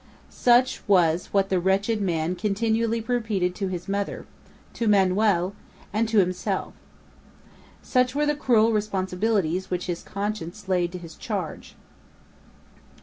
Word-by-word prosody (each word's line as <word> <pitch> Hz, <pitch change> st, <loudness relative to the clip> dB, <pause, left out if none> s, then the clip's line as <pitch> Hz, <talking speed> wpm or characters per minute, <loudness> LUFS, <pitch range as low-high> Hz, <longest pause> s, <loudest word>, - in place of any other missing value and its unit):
Such 245 Hz, +1 st, +3 dB
was 175 Hz, -3 st, +3 dB
what 195 Hz, -1 st, +1 dB
the 185 Hz, -, +2 dB
wretched 200 Hz, +4 st, +1 dB
man 170 Hz, -2 st, 0 dB
continually 225 Hz, +3 st, 0 dB
repeated 220 Hz, -6 st, -1 dB
to 195 Hz, +1 st, -3 dB
his 180 Hz, -2 st, -5 dB
mother, 200 Hz, 0 st, -3 dB, 0.5 s
to 230 Hz, -, -2 dB
Manoel, 195 Hz, -2 st, +3 dB, 0.4 s
and 220 Hz, +1 st, +1 dB
to 220 Hz, -, +1 dB
himself. 185 Hz, -2 st, 0 dB, 1.1 s
Such 255 Hz, 0 st, +1 dB
were 295 Hz, +1 st, +2 dB
the 295 Hz, -, +2 dB
cruel 230 Hz, -6 st, +3 dB
responsibilities 190 Hz, -3 st, 0 dB
which 180 Hz, -1 st, -2 dB
his 175 Hz, -2 st, -3 dB
conscience 205 Hz, -1 st, -5 dB
laid 180 Hz, -2 st, +1 dB
to -, -, -4 dB
his 165 Hz, -2 st, -10 dB
charge. -, -, -5 dB
200 Hz, 130 wpm, -25 LUFS, 180-220 Hz, 1.1 s, Such